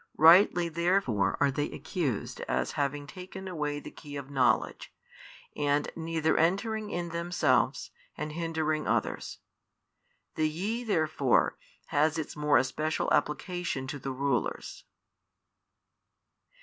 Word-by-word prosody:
Rightly 170 +2 +7
therefore 170 - +1
are 140 -1 +3
they 145 +3 -1
accused 145 - -3
as 65 +1 0
having 145 -1 -2
taken 190 +4 -9
away 150 -5 -2
the - - -10
key 145 -2 -10
of 140 -1 -7
knowledge, 130 -3 +1 0.6
and 145 0 +1
neither 160 -1 0
entering 210 +6 +1
in 175 -2 -3
themselves, 170 -5 +1 0.3
and 150 0 -4
hindering 160 -1 -1
others. - - -1 1.0
The 155 -1 +1
YE 205 +10 -3
therefore 155 - +2 0.3
has 155 +2 +2
its 160 - -4
more 150 -1 +3
especial 155 +5 0
application 170 -3 -1
to 145 - -5
the 135 +1 -4
rulers. 130 -3 -2
155 Hz, 115 wpm, -29 LUFS, 145-170 Hz, 1.0 s, Rightly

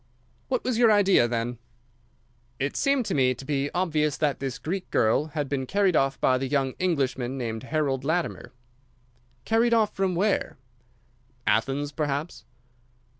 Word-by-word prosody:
"What - - -1
was 245 -3 -1
your 235 -2 +6
idea, 195 - +4
then?" 120 0 -3 1.0
"It 135 +2 -2
seemed 275 -3 +1
to 195 - -2
me 130 -2 +2
to 135 - -10
be 140 0 -1
obvious 155 -5 0
that 150 -3 0
this 135 -1 -4
Greek 185 +3 -4
girl 110 +6 +2
had 150 -2 -3
been 130 -2 -2
carried 195 -1 +2
off 135 -1 +1
by 130 -1 +2
the 135 - -2
young 135 -1 0
Englishman 135 -7 -1
named 115 -3 -4
Harold 135 -2 -1
Latimer." 165 +4 -2 0.9
"Carried 230 +1 +3
off 215 -2 +1
from 190 -2 0
where?" 200 +3 0 0.9
"Athens, 140 +5 0
perhaps." 150 +2 -3
145 Hz, 150 wpm, -26 LUFS, 135-185 Hz, 1.0 s, your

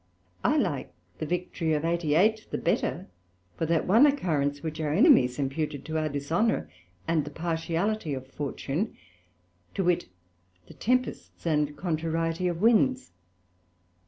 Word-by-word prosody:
I - - +3
like - - -1 0.3
the 155 - -3
victory 175 -2 -1
of 150 +1 0
88. 170 +6 +2
the - - -2
better - - -1 0.5
for 165 - -2
that 165 0 +1
one 230 +10 +6
occurrence, 145 - 0
which 160 0 -4
our 150 -2 -1
enemies 125 -4 +5
imputed 145 +1 -2
to 160 0 -1
our 155 0 -1
dishonour 160 +11 0 0.4
and 160 -2 +2
the 145 - -6
partiality 165 +2 -1
of 130 0 -7
Fortune, 145 +7 -3 0.8
to 195 - 0
wit, 175 -1 +1 0.6
the - - -13
tempests 255 -4 -2
and 150 -2 +1
contrariety 165 +1 -1
of 175 +2 -2
Winds. 250 +3 +3
165 Hz, 135 wpm, -27 LUFS, 150-180 Hz, 0.8 s, one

